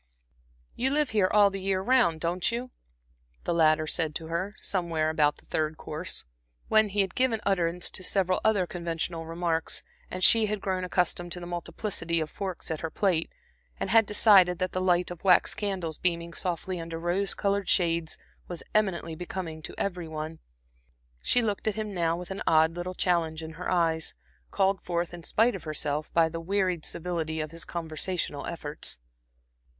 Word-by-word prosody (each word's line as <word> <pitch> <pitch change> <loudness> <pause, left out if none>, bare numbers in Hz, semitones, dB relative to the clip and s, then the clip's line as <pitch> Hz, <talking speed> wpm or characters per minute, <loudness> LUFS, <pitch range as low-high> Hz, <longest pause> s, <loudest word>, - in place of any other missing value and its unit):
"You 260 +2 0
live 295 0 +1
here 200 -4 +3
all 205 -1 +6
the 195 0 -5
year 190 0 +1
round, 190 -7 +3
don't 175 +5 0
you?" 245 +2 -4 0.7
the 175 - 0
latter 155 -1 +4
said 155 -1 -1
to 165 - -4
her, 185 +5 -2
somewhere 165 -4 0
about 150 -2 +2
the - - -21
third 155 0 -1
course, 155 - -5 0.4
when 220 -1 +5
he 200 +1 +2
had 190 -2 -2
given 250 -4 +1
utterance 180 -2 +1
to 185 - -7
several 185 -1 +2
other 210 -4 +3
conventional 170 -1 -3
remarks, 165 -1 -1 0.3
and 185 0 -4
she 225 -2 +7
had 210 0 -2
grown 185 -1 -1
accustomed 175 -1 0
to 180 - -6
the 175 - -7
multiplicity 175 -1 -3
of 155 -1 -3
forks 190 -5 -5
at 160 - -2
her 165 - -3
plate, 175 -3 0 0.5
and - - -2
had 225 -2 +6
decided 195 -4 +6
that 185 +1 -1
the 185 - -2
light 180 -1 +2
of 175 +1 -9
wax 190 0 +5
candles, 195 -6 -3
beaming 170 -1 0
softly 180 +1 -3
under 165 0 -5
rose 175 +3 +1
colored 200 -1 0
shades, 170 -3 +2 0.3
was 175 -2 -6
eminently 190 -6 +1
becoming 165 -1 -5
to - - -7
every 180 -4 -2
one. 155 0 -5 0.8
She 245 - +2
looked 210 -1 -2
at 215 - +1
him 215 -1 -3
now 170 -2 +1
with 180 +1 -7
an 190 - -4
odd 160 0 +4
little 180 +1 -4
challenge 165 -3 +1
in 160 - -6
her 165 +3 -5
eyes, 165 -3 +1 0.3
called 195 -1 +1
forth, 175 0 -2
in 175 - -7
spite 225 +8 +2
of 195 - -7
herself, 150 -1 -2
by 165 -1 +4
the 165 +1 -5
wearied 185 -2 0
civility 160 -2 -2
of 155 -1 -3
his 165 0 -6
conversational 165 -1 -3
efforts. 150 - -4
175 Hz, 180 wpm, -28 LUFS, 165-195 Hz, 0.8 s, she